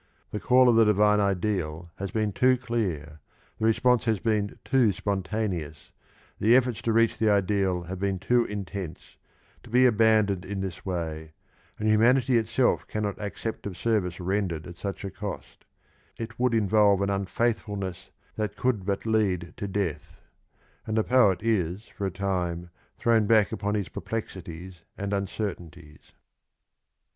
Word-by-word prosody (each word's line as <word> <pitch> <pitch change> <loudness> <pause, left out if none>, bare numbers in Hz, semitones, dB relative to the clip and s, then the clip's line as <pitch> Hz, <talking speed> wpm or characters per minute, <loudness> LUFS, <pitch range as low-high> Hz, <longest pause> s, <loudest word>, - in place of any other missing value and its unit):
The 105 - -3
call 125 +2 +5
of 120 - +5
the 115 - +6
divine 105 0 +4
ideal 90 -5 -1
has 100 0 -4
been 105 -1 -1
too 130 +3 +4
clear, 90 - -3 0.4
the 110 - 0
response 120 +2 +3
has 110 -3 +1
been 105 -2 -1
too 130 -6 +3
spontaneous, 90 -6 -3 0.5
the 115 +4 +5
efforts 125 -4 +2
to 115 - 0
reach 115 0 +2
the 110 - +3
ideal 95 -3 +1
have 90 +2 -6
been 100 -1 0
too 120 +6 +2
intense, 100 -4 -6 0.5
to 120 - -15
be 125 +3 +5
abandoned 110 -5 +3
in 100 +1 -5
this 95 -2 -5
way, 80 -4 -4 0.4
and 110 - -2
humanity 120 +3 +4
itself 115 +3 +1
cannot 105 -1 -3
accept 105 +1 -5
of 95 - -7
service 100 -7 0
ren 95 +2 0
dered 80 -2 -5
at 85 - -9
such 100 +1 -5
a 95 - -4
cost; 100 +1 -7 0.5
it 115 +1 -7
would 125 -2 +2
involve 105 -2 +4
an 100 - 0
unfaithfulness 100 -2 -2 0.3
that 105 -2 -3
could 125 -6 0
but 100 +1 -1
lead 100 -6 0
to 100 - -4
death; 95 -6 -3 0.7
and 110 0 -1
the 110 - +3
poet 105 -8 +3
is 100 -4 0
for 100 - -2
a - - -3
time 90 -3 -2 0.3
thrown 115 -3 +3
back 110 -2 +4
upon 105 +1 -2
his 100 -3 -1
perplexities 90 -5 -6 0.2
and 100 0 -3
uncertainties. 90 -6 -5
100 Hz, 155 wpm, -27 LUFS, 90-110 Hz, 0.7 s, the